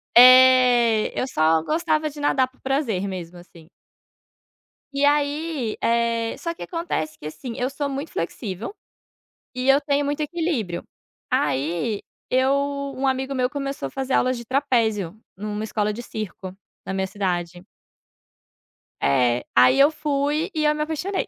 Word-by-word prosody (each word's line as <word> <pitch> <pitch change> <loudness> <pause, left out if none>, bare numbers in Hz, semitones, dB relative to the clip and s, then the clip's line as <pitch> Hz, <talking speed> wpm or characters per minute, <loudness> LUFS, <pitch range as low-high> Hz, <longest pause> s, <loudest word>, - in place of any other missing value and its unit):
É, 250 -3 +7
eu - - 0
só 160 -6 +2
gostava 310 - 0
de 295 0 -11
nadar 265 -3 +2
por 265 - -30
prazer 250 -8 -1
mesmo 180 -2 -6
assim. 170 -2 -16 1.2
E 280 +1 0
aí, 290 -3 0
eh, 230 0 0
só 335 -1 -4
que - - -9
acontece 330 - -3
que, - - -11
assim, 235 - -7
eu 250 +2 -1
sou 280 +1 -3
muito 275 +3 -5
flexível 195 - -4 0.8
e 255 +1 -2
eu 270 +1 +7
tenho 285 0 0
muito 290 +2 -2
equilíbrio. 300 - -2 0.5
Aí, 165 - 0 0.3
eu 260 +1 +3 0.5
um 270 +1 -1
amigo 265 +1 -1
meu 250 0 0
começou 275 - -4
a - - -14
fazer 265 0 -3
aulas 255 -1 +2
de 235 - -8
trapézio, 230 - 0 0.2
em 210 - -7
uma 210 0 -3
escola 210 -1 -1
de 240 +3 -7
circo, 190 -4 -7 0.3
na 190 - -4
minha 190 0 -1
cidade. 180 -3 -3 1.4
É, 125 -3 +2
aí 125 - +6
eu 285 +3 +6
fui 295 +3 -1
e 305 -1 0
eu 300 - +4
me 300 - -3
apaixonei. 320 +6 -2
255 Hz, 150 wpm, -23 LUFS, 195-285 Hz, 1.4 s, É